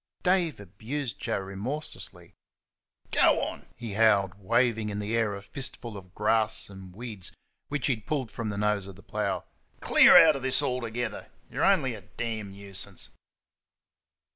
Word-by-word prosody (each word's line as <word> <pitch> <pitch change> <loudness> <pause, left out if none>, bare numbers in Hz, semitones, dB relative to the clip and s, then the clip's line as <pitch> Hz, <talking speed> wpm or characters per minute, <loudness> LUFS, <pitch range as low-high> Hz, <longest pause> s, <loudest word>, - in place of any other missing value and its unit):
Dave 180 - +2
abused 110 +6 -5
Joe - - -1
remorselessly. 100 +11 -6 0.8
"Go - - +5
on!" - - -5
he 115 -3 -6
howled, 100 -3 +4
waving 115 +1 +2
in 100 - -3
the 105 +2 -1
air 110 -3 +1
a 100 - -8
fistful 120 -2 -4
of 95 -1 -11
grass 110 0 +2
and 95 -2 -11
weeds 110 -5 -5 0.4
which 145 -2 -2
he 135 - +4
had 110 -3 -9
pulled 135 -7 -1
from 115 -2 -4
the 100 - -3
nose 105 -1 +1
of 100 - -10
the 100 - -16
plough; - - -2 0.3
"clear - - +8
out 160 -2 +8
of 135 - -4
this 130 0 +1
altogether! 120 -3 -3 0.2
you're - - -1
only - - +4
a - - -8
damn 110 -4 -5
nuisance." 100 -1 -8
110 Hz, 160 wpm, -28 LUFS, 100-125 Hz, 0.8 s, clear